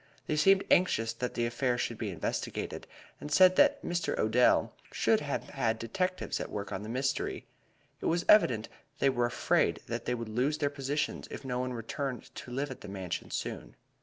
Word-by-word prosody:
They 155 - -1
seemed 195 +5 +5
anxious 115 -11 +3
that 125 +2 -4
the 120 - +1
affair 120 +1 0
should 120 -2 -2
be 110 - -2
investigated, 90 - -4 0.3
and 150 - -7
said 185 +3 +7
that 290 0 +4
Mr. 175 -1 -1
Odell 115 +3 +3 0.2
should - - +2
have - - -3
had 110 -1 0
detectives 185 +12 -2
at - - -4
work 100 -1 -5
on 95 - -3
the 105 - -7
mystery. 130 +2 -1 0.6
It - - -1
was 170 +1 +1
evident 120 - +5 0.3
they 135 - +3
were 120 -2 +1
afraid - - +1
that - - -4
they 125 - 0
would 115 -1 -5
lose 125 +7 0
their 145 -1 0
positions 145 +1 -2
if - - -8
no 125 -1 -2
one 125 0 -2
returned 125 +3 -5
to - - -9
live 135 +3 -2
at 130 - -9
the - - -9
Mansion 95 -2 -5
soon. - - -5
125 Hz, 195 wpm, -31 LUFS, 115-150 Hz, 0.6 s, said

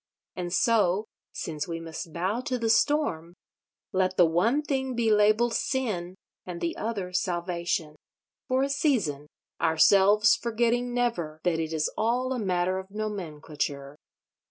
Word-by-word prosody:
And 175 -1 -4
so—since 195 - 0
we 165 -1 -4
must 165 0 -7
bow 185 +8 -1
to 255 - 0
the 230 -2 +1
storm—let 185 - -1
the 175 - +7
one 220 - +2
thing 265 -3 -2
be 230 -2 +2
labelled 215 +3 +4
Sin, 200 -10 -2 0.3
and 180 -2 -7
the 335 - -2
other 200 -5 -4
Salvation—for 175 - -3
a - - +1
season: 230 - 0 0.3
ourselves 200 +6 +5
forgetting 240 +1 0
never 175 -11 -1
that 170 -2 +1
it 160 -1 -2
is 155 -1 0
all 250 +3 +1
a 250 - -3
matter 185 -2 0
of 190 0 -10
nomenclature. 155 -9 -4
190 Hz, 130 wpm, -27 LUFS, 170-235 Hz, 0.3 s, the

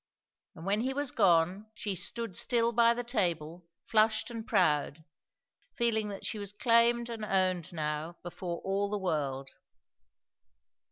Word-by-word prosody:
And 160 - -10
when 205 +3 +1
he 265 +2 -2
was 285 -2 -1
gone, 185 +1 +2
she 205 - -3
stood 200 +3 -3
still 235 +2 +1
by 235 0 +4
the 245 - -3
table, 175 - -1 0.2
flushed 220 +2 +2
and 230 0 -7
proud, 160 -6 +1 0.7
feeling 220 -3 +1
that 200 -1 -7
she 215 - -3
was 200 -1 -6
claimed 235 +2 +3
and 230 -2 -6
owned 185 -4 +1
now 155 +1 -3
before 175 0 -5
all 200 +1 -1
the 210 - -1
world. 145 -8 -2
200 Hz, 145 wpm, -30 LUFS, 170-230 Hz, 0.7 s, by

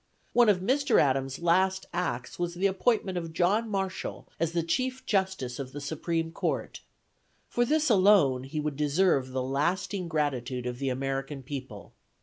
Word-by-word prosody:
One 240 -2 +6
of 185 -3 +3
Mr. 270 +6 +3
Adams' 135 -1 +1
last 185 +3 +2
acts 125 -8 -3
was 175 0 -2
the 185 +3 -1
appointment 195 -1 +1
of 165 -1 -7
John 200 +7 +2
Marshall 195 -2 -3
as 165 0 0
chief 255 +7 -1
justice 190 - -1
of 130 -1 -6
the 145 - -5
supreme 165 +3 -2
court; - - -3 0.7
for 240 - +1
this 310 +4 +2
alone, 185 - +4
he 145 +3 -4
would 150 -1 -2
deserve 150 -2 +2
the 130 0 -2
lasting 175 +8 -1
gratitude 130 -6 -1
of 125 0 -4
the 135 -1 -1
American 135 +1 -3
people. 130 -6 -8
165 Hz, 155 wpm, -28 LUFS, 135-190 Hz, 0.7 s, One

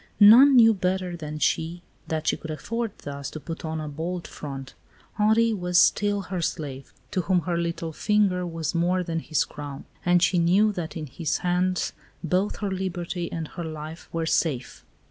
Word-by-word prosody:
None 245 +7 +9
knew 225 -2 +8
better 185 -2 -1
than 155 -2 -6
she 165 +3 0 0.2
that 155 -1 -2
she - - +2
could 160 - -9
afford 225 +8 -3
thus 140 -1 -5
to 155 - -7
put 165 +3 -7
on 160 0 -3
a 155 - -4
bold 170 +4 -4
front. 135 -3 -7 0.5
Henri 220 +2 +4
was 180 -3 0
still 205 +2 +4
her 185 -2 -4
slave, 135 -5 -4 0.2
to 185 - 0
whom 180 0 +2
her 175 0 -2
little 170 -1 -2
finger 200 -1 +2
was 165 -2 -3
more 180 +2 +1
than 165 -2 -2
his 155 -1 0
crown; 145 -2 -8 0.2
and 175 0 +4
she 175 +1 +3
knew 190 +6 +4
that 175 -5 -5
in 155 - -4
his 150 +3 -2
hands 180 +1 +1 0.3
both 185 +5 0
her 200 -2 -1
liberty 180 -2 -3
and 165 -2 -4
her 175 - -6
life 155 0 -7
were 165 -1 -1
safe. 150 -6 -1
175 Hz, 185 wpm, -25 LUFS, 160-185 Hz, 0.5 s, None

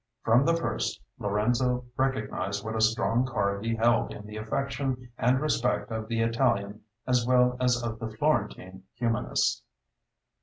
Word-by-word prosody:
From 120 +4 +4
the 165 +1 +3
first, 165 - -2 0.2
Lorenzo 120 +5 +1
recognized 105 -7 -1
what 110 0 -3
a 110 - 0
strong 115 +2 +2
card 100 -5 -1
he 115 0 0
held 115 +1 +2
in 105 - -9
the 105 0 -9
affection 125 +2 -3
and 125 +2 +2
respect 130 -6 0
of 110 0 -3
the 115 0 -1
Italian 105 -2 +1 0.2
as 125 -2 +2
well 125 0 +4
as 125 -1 +2
of 115 -1 -4
the 110 - -4
Florentine 110 -7 -1
humanists. 115 -2 0
115 Hz, 150 wpm, -28 LUFS, 110-125 Hz, 0.2 s, From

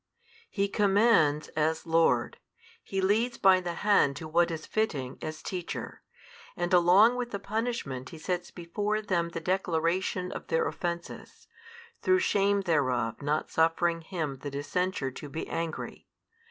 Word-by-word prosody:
He 200 -1 0
commands 200 -7 +3
as 160 +1 -1
Lord, 160 -8 +2 0.4
He 195 -1 -2
leads 220 +6 +1
by 190 -1 +5
the 175 -1 -4
hand 200 -9 +4
to 160 +2 -7
what 170 +2 +3
is 160 -2 -5
fitting, 145 -13 -2
as 155 0 -6
teacher; 180 -2 -5 0.6
and 175 +1 -1
along 185 +7 +6
with 245 -1 -3
the 200 - -3
punishment 200 - -3
He 165 - -10
sets 175 +2 -3
before 205 +5 -2
them 170 -4 0
the 170 - -5
declaration 180 +1 -1
of - - -7
their 480 -2 +1
offences, 170 - -6 0.6
through 370 0 +4
shame 200 - +2
thereof 130 - 0
not 150 +2 -1
suffering 165 +1 +2
him 160 -6 -4
that 140 -1 -6
is 145 +1 -4
censured 180 -8 -1
to 145 - -8
be 160 +3 -5
angry. 165 -1 -5
175 Hz, 150 wpm, -29 LUFS, 155-200 Hz, 0.6 s, along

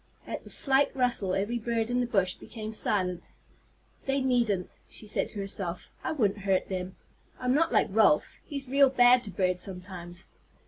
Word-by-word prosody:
At - - -6
the - - -12
slight 275 0 +4
rustle 245 -7 +1
every 210 +5 -1
bird 230 0 -1
in 245 - +1
the 245 - 0
bush 195 -6 +1
became 220 -1 -8
silent. 185 -5 -1 0.8
"They 270 +1 +1
needn't," 235 -8 0
she - - -5
said 210 - 0
to 210 - -5
herself. 195 -3 -5
"I - - -1
wouldn't 210 -9 0
hurt 195 -1 0
them. 185 -1 -4 0.4
I'm 250 0 +1
not 325 +4 +2
like - - +4
Ralph. 205 -7 +3
He's 280 -3 -6
real 275 +1 +5
bad 250 -1 +5
to - - -4
birds 180 -1 0
sometimes. 180 -1 -7
215 Hz, 175 wpm, -28 LUFS, 185-250 Hz, 0.8 s, real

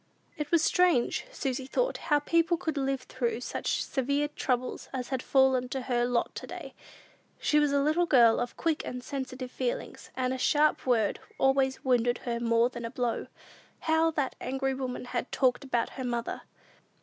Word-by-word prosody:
It 300 -1 -4
was 335 -2 +3
strange, 360 - +2
Susy 265 - -3
thought, - - 0
how 295 - +5
people 335 +3 +2
could 320 -3 -3
live 270 -1 -1
through 245 -2 -2
such - - -2
severe 280 +2 0
troubles 255 -3 -2
as 255 -2 -4
had 260 -2 -1
fallen 265 -2 +3
to 265 +1 -3
her 240 -1 0
lot 245 -1 0
to - - -7
day. - - -8 0.6
She 300 - +2
was 295 -1 +2
a 280 - +3
little 325 +4 +2
girl 235 -6 +6
of 245 - -3
quick 325 -2 0
and 250 0 -6
sensitive 260 -2 -5
feelings, 250 -2 -4
and 255 0 0
a 260 - -4
sharp 295 +1 +2
word 225 -5 +2 0.2
always 270 0 +2
wounded 245 -1 +2
her 235 -1 -1
more 230 0 +3
than 240 -2 -7
a 230 - -3
blow. 245 -1 -2 0.5
How 320 0 +3
that 290 -5 -2
angry 270 +1 -1
woman 260 -2 -4
had 245 0 -3
talked 255 0 +2
about 240 -4 0
her 260 - -6
mother! 240 -1 -3
260 Hz, 180 wpm, -29 LUFS, 245-290 Hz, 0.6 s, girl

